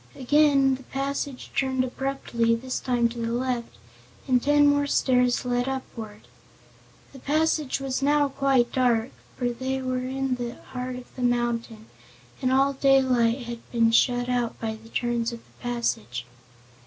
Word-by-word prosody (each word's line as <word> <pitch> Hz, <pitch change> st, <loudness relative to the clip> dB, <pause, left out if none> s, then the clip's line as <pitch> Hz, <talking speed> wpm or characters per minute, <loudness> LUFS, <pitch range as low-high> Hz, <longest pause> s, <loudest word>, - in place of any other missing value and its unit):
Again 275 Hz, 0 st, +4 dB
the 260 Hz, -, -5 dB
passage 275 Hz, 0 st, -4 dB
turned 260 Hz, -1 st, +1 dB
abruptly, 250 Hz, -3 st, -1 dB
this 255 Hz, +2 st, -4 dB
time 245 Hz, -2 st, +1 dB
to 235 Hz, +1 st, -8 dB
the 230 Hz, 0 st, -2 dB
left, 245 Hz, -1 st, -2 dB, 0.5 s
and 250 Hz, -2 st, +3 dB
ten 290 Hz, +2 st, +4 dB
more 285 Hz, 0 st, +3 dB
stairs 250 Hz, -3 st, +2 dB
led 245 Hz, +1 st, 0 dB
upward. 225 Hz, -5 st, -7 dB, 0.9 s
The 270 Hz, -, -11 dB
passage 305 Hz, 0 st, 0 dB
was 270 Hz, 0 st, -2 dB
now 290 Hz, 0 st, +3 dB
quite 270 Hz, -3 st, +2 dB
dark, 245 Hz, -2 st, +2 dB, 0.3 s
for 245 Hz, -1 st, 0 dB
they 260 Hz, +2 st, -3 dB
were 255 Hz, -1 st, -2 dB
in 265 Hz, -1 st, -1 dB
the 240 Hz, 0 st, -4 dB
heart 250 Hz, 0 st, -6 dB
of 250 Hz, 0 st, -11 dB
the 255 Hz, -, -7 dB
mountain 240 Hz, -2 st, -1 dB, 0.6 s
and 255 Hz, -, +1 dB
all 270 Hz, +1 st, +3 dB
daylight 260 Hz, -3 st, +3 dB
had 235 Hz, 0 st, -6 dB
been 230 Hz, -1 st, +3 dB
shut 245 Hz, +1 st, +3 dB
out 245 Hz, -2 st, -1 dB
by 220 Hz, -1 st, -2 dB
the 225 Hz, +1 st, -15 dB
turns 240 Hz, 0 st, -1 dB
of 235 Hz, -1 st, -10 dB
the -, -, -26 dB
passage. 120 Hz, -, -2 dB
250 Hz, 155 wpm, -25 LUFS, 235-270 Hz, 0.9 s, Again